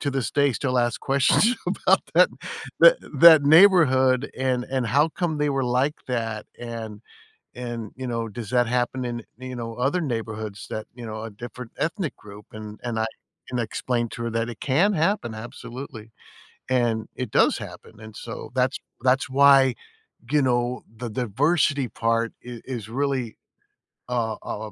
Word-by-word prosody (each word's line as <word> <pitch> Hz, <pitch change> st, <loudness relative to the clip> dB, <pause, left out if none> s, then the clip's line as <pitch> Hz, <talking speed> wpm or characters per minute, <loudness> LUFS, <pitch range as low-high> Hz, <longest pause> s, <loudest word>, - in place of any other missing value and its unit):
to 140 Hz, -, -1 dB
this 135 Hz, -3 st, -2 dB
day, 140 Hz, -2 st, +3 dB
still 130 Hz, +1 st, -1 dB
ask 120 Hz, -1 st, +1 dB
questions 140 Hz, -, +3 dB
about -, -, +2 dB
that -, -, +7 dB, 0.5 s
tha -, -, +9 dB, 0.2 s
that 160 Hz, -3 st, +9 dB
neighborhood 145 Hz, -6 st, +5 dB
and 130 Hz, -1 st, 0 dB
and 130 Hz, -3 st, -2 dB
how 145 Hz, +7 st, +3 dB
come 165 Hz, -3 st, -2 dB
they 150 Hz, 0 st, +1 dB
were 135 Hz, -1 st, 0 dB
like 130 Hz, +5 st, +1 dB
that, 115 Hz, -3 st, -2 dB
and 115 Hz, -3 st, -7 dB, 0.6 s
and, 120 Hz, -3 st, -6 dB
you 130 Hz, -, -7 dB
know, 115 Hz, -1 st, -2 dB
does 110 Hz, 0 st, -7 dB
that 125 Hz, -1 st, +3 dB
happen 125 Hz, +1 st, -1 dB
in, 120 Hz, -1 st, -4 dB, 0.2 s
you 130 Hz, 0 st, -7 dB
know, 115 Hz, -1 st, -5 dB
other 135 Hz, +9 st, +1 dB
neighborhoods, 110 Hz, -, -4 dB
that, 110 Hz, -, -4 dB
you 120 Hz, -2 st, -8 dB
know, 110 Hz, 0 st, -6 dB
of 110 Hz, -3 st, -8 dB
different 120 Hz, +1 st, -8 dB
ethnic 165 Hz, 0 st, -2 dB
group, 105 Hz, 0 st, -13 dB
and 110 Hz, 0 st, -9 dB, 0.2 s
I 110 Hz, -, +1 dB, 0.4 s
and 125 Hz, -, -2 dB
I -, -, 0 dB
explained 120 Hz, 0 st, -2 dB
to 115 Hz, -, -6 dB
her 115 Hz, -, -2 dB
that 115 Hz, +1 st, -1 dB
it 115 Hz, -, -8 dB
can 170 Hz, +10 st, +2 dB
happen, 160 Hz, -, 0 dB
absolutely, 115 Hz, 0 st, -9 dB, 0.6 s
and 120 Hz, -3 st, +1 dB
it 125 Hz, -4 st, -4 dB
does -, -, +4 dB
happen, -, -, -10 dB
and 110 Hz, 0 st, -11 dB
so, 115 Hz, -1 st, -8 dB
that's 130 Hz, +1 st, +1 dB, 0.2 s
that's 130 Hz, +1 st, +2 dB
why, 135 Hz, -1 st, +6 dB, 0.6 s
you 150 Hz, -1 st, +3 dB
know, 120 Hz, -1 st, 0 dB
the 120 Hz, +1 st, -5 dB
diversity 135 Hz, -, +1 dB
part 115 Hz, 0 st, 0 dB
i 120 Hz, -2 st, -8 dB
is 120 Hz, -5 st, -6 dB
really, 130 Hz, -1 st, -2 dB, 0.7 s
a 115 Hz, -3 st, -1 dB
a, 110 Hz, 0 st, -5 dB
125 Hz, 170 wpm, -24 LUFS, 115-135 Hz, 0.7 s, tha